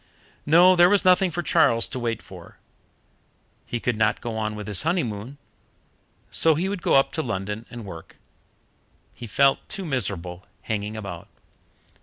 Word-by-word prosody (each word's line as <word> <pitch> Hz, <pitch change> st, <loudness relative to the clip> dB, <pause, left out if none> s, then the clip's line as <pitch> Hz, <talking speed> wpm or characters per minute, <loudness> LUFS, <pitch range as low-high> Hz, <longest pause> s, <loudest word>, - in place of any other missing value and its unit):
No, 175 Hz, +4 st, +6 dB
there 175 Hz, 0 st, +6 dB
was 205 Hz, -1 st, +2 dB
nothing 185 Hz, 0 st, +4 dB
for 175 Hz, +1 st, -4 dB
Charles 140 Hz, -11 st, +3 dB
to 130 Hz, -, -4 dB
wait 115 Hz, -2 st, -3 dB
for. -, -, -13 dB, 1.1 s
He 120 Hz, -, -3 dB
could 120 Hz, 0 st, -1 dB
not 105 Hz, -1 st, +1 dB
go 115 Hz, -2 st, -5 dB
on 110 Hz, -1 st, -3 dB
with 105 Hz, -1 st, -7 dB
his 105 Hz, -3 st, +3 dB
honeymoon, 135 Hz, -, -2 dB, 0.9 s
so 160 Hz, -1 st, +3 dB
he 175 Hz, +5 st, -1 dB
would 200 Hz, -2 st, -4 dB
go -, -, +2 dB
up 135 Hz, -, +4 dB
to 160 Hz, -, -2 dB
London 105 Hz, -2 st, -4 dB
and 120 Hz, -3 st, -9 dB
work 85 Hz, -4 st, -11 dB, 1.0 s
he 120 Hz, -, -9 dB
felt 135 Hz, +5 st, +3 dB
too 195 Hz, -1 st, -3 dB
miserable 95 Hz, -, -3 dB, 0.2 s
hanging 105 Hz, 0 st, -3 dB
about. 95 Hz, -5 st, -8 dB
120 Hz, 160 wpm, -24 LUFS, 105-165 Hz, 1.1 s, No